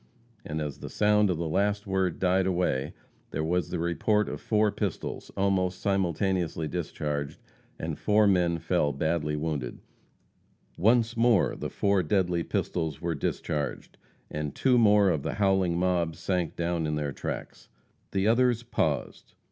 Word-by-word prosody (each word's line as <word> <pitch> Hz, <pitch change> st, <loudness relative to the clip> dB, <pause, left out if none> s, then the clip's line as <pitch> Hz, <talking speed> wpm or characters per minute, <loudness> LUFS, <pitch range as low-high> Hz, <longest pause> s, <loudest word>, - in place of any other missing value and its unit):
And 75 Hz, 0 st, -4 dB
as 75 Hz, -3 st, -4 dB
the -, -, -7 dB
sound 105 Hz, -1 st, +3 dB
of 90 Hz, -, 0 dB
the 85 Hz, 0 st, -2 dB
last 100 Hz, +5 st, 0 dB
word 95 Hz, -3 st, 0 dB
died 95 Hz, 0 st, +2 dB
away, 85 Hz, -7 st, 0 dB, 0.3 s
there 80 Hz, -, -2 dB
was 85 Hz, 0 st, 0 dB
the -, -, -2 dB
report 85 Hz, +6 st, +1 dB
of -, -, -6 dB
four 105 Hz, -1 st, +2 dB
pistols, 100 Hz, -4 st, -4 dB
almost 95 Hz, -2 st, +1 dB
simultaneously 90 Hz, -4 st, 0 dB
discharged, 75 Hz, -3 st, -3 dB, 0.4 s
and -, -, -4 dB
four 105 Hz, +1 st, +3 dB
men 90 Hz, -4 st, +3 dB
fell 80 Hz, -3 st, 0 dB
badly 75 Hz, +1 st, -1 dB
wounded; 75 Hz, -5 st, -3 dB, 1.0 s
once 115 Hz, +4 st, +3 dB
more 115 Hz, -3 st, +3 dB
the -, -, -4 dB
four 100 Hz, -1 st, +1 dB
deadly 90 Hz, 0 st, +1 dB
pistols 80 Hz, -2 st, -2 dB
were 85 Hz, -1 st, -1 dB
discharged, 75 Hz, 0 st, -3 dB, 0.4 s
and 75 Hz, -1 st, -4 dB
two 125 Hz, -2 st, +3 dB
more 105 Hz, -3 st, +5 dB
of 80 Hz, -4 st, -1 dB
the -, -, -3 dB
howling 95 Hz, -4 st, +2 dB
mob 85 Hz, -3 st, +1 dB
sank 90 Hz, -2 st, -2 dB
down 85 Hz, -2 st, -1 dB
in 75 Hz, -, -1 dB
their 75 Hz, -1 st, -2 dB
tracks. -, -, -6 dB, 0.4 s
The 100 Hz, +1 st, 0 dB
others 120 Hz, 0 st, +3 dB
paused. 120 Hz, -, -2 dB
90 Hz, 150 wpm, -28 LUFS, 80-100 Hz, 1.0 s, more